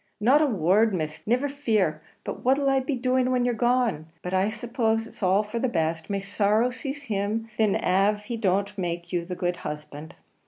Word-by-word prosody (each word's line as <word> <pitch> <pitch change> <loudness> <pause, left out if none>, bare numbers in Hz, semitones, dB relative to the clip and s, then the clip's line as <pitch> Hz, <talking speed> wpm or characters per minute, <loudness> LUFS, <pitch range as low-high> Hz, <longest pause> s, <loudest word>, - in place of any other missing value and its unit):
"Not 260 +8 +5
a 305 - +4
word, 205 - +3
Miss; 155 0 -5
niver 250 +5 +2
fear: 215 - 0 0.2
but - - -6
what'll 270 +2 +3
I 270 - +3
be 265 +2 -2
doing 255 +1 +1
when 250 -1 +1
you're 245 - +1
gone? 240 -9 +1 0.2
But 180 - -4
I 190 +2 +2
suppose 225 0 -1
it's 225 - -14
all 190 +2 +3
for 215 +3 -4
the 260 - +1
best; 160 -4 -1
may 200 -1 -1
sorrow 210 +4 +1
seize 275 +3 -6
him 220 -1 -2
thin 215 -3 +2
av 200 +3 +2
he 235 +3 -5
don't 200 -1 0
make 175 0 -4
you 170 -1 0
the 180 +1 -5
good 175 -1 -1
husband." 150 0 -7
215 Hz, 200 wpm, -26 LUFS, 185-245 Hz, 0.2 s, Not